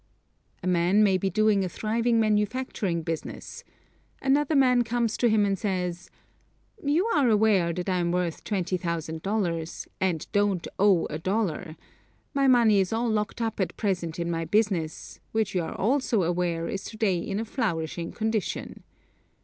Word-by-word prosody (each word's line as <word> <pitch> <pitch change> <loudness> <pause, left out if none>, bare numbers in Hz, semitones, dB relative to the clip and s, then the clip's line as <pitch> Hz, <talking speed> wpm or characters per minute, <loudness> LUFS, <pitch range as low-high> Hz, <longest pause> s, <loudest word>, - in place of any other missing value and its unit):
A - - -2
man 180 +4 +3
may 190 -3 +3
be 195 - 0
doing 210 +1 +3
a 185 - -2
thriving 230 +4 0
manufacturing 210 -4 0
business 165 -1 -6 0.6
another 290 +3 +2
man 250 -3 +4
comes 235 -1 -1
to 240 - +3
him 215 -1 +3
and 195 -2 0
says: 180 -3 -2 0.7
"You 305 +7 +2
are 280 -6 +3
aware 210 -5 +3
that 180 +2 -4
I 185 -1 +1
am 170 -1 0
worth 175 -2 -2
$20,000, 170 -1 -2
and 180 -5 0
don't 205 -4 +1
owe 195 -4 +4
a 155 - -5
dollar; 180 -3 -2 0.6
my 275 -1 +2
money 235 -5 +5
is 190 -1 0
all 230 +1 0
locked 210 +2 -1
up 225 -2 -3
at 190 - -2
present 175 -6 -1
in 170 0 -2
my 165 0 -1
business, 180 -3 -1
which 220 -3 0
you 180 - +1
are 160 - -5
also 240 -3 +1
aware 170 -1 -1
is 195 +2 -4
to 220 - -8
day 195 -5 +1
in 195 +4 -3
a 225 - -2
flourishing 170 - -2
condition. 220 -3 -3
195 Hz, 160 wpm, -26 LUFS, 175-220 Hz, 0.7 s, money